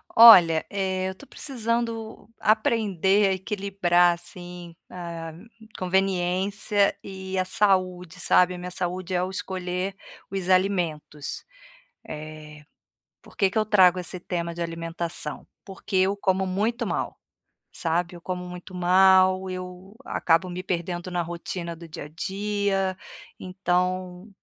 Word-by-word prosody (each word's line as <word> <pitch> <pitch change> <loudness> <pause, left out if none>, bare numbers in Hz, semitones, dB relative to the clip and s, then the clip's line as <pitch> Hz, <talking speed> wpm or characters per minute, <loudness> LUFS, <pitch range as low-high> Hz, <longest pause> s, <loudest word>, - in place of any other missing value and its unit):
Olha, 175 -9 +9
eh, 190 -1 -1
eu 190 - -7
tô 280 - -14
precisando 230 -5 -3
aprender 210 - +2
a - - +2
equilibrar, 190 -3 +2
assim, 175 0 -9
a 170 -2 -7 0.5
conveniência 190 +2 +1
e 190 -1 -6
a 185 - +3
saúde, 185 -2 +1
sabe. 180 +1 +4
A - - -6
minha 180 0 -6
saúde 180 +1 -3
ao 180 +1 0
escolher 185 0 -3 0.3
os 190 -2 -4
alimentos, 175 -6 0 0.6
eh, 150 0 -9 0.6
por - - -18
que 195 - +3
que - - -3
eu 215 - +3
trago 185 -4 +5
esse 180 0 -6
tema 170 -1 -3
de 175 - -5
alimentação? 165 -2 -4 0.2
Porque 195 +1 -7
eu 190 +2 +3
como 190 -1 +1
muito 220 +6 -1
mal, - - -3 0.6
sabe. 170 +1 -1
Eu - - -12
como 180 0 -4
muito 180 +1 -10
mal, 185 +1 +5
eu 185 +2 -8
acabo 170 +2 +1
me 180 +1 -5
perdendo 175 0 -3
na 175 -1 0
rotina 170 0 -5
do 170 0 -11
dia 155 - -7
a - - -10
dia, 195 +2 -1 0.4
então 185 0 -2
185 Hz, 130 wpm, -25 LUFS, 175-195 Hz, 0.6 s, Olha